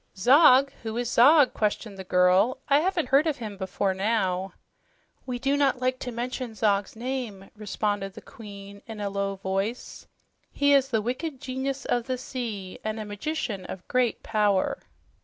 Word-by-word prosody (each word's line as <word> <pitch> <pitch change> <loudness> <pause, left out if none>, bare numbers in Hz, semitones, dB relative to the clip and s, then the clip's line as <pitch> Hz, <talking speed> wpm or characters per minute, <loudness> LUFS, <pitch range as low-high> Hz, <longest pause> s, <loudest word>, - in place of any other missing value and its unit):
"Zog! 270 - +6
Who 225 0 -4
is 245 0 -2
Zog?" 280 +3 +6
questioned 210 0 -2
the 190 - -7
girl. 180 +6 +3
"I 280 0 +5
haven't 340 -5 0
heard 280 +4 +4
of 305 - 0
him 215 -4 -6
before 190 0 -1
now." 190 -2 -1 0.7
"We 250 -1 -2
do 275 +3 0
not 280 -3 +2
like 255 0 0
to 250 - -5
mention 240 0 -4
Zog's 205 -2 0
name," 235 -5 -5
responded 205 -1 -2
the - - -9
Queen 200 -2 -11
in 220 -2 -8
a 200 -1 -3
low 200 0 -2
voice. 195 +5 -4 0.4
"He 285 0 +3
is 275 -1 +4
the 220 -4 0
wicked 260 +4 -3
genius 265 +1 -4
of 240 -1 0
the 255 -1 -1
sea, 220 -8 -6
and 215 0 -3
a 215 - -5
magician 205 -1 -4
of 185 - -8
great 250 -2 0
power." 210 -3 +1
225 Hz, 170 wpm, -26 LUFS, 200-260 Hz, 0.7 s, Zog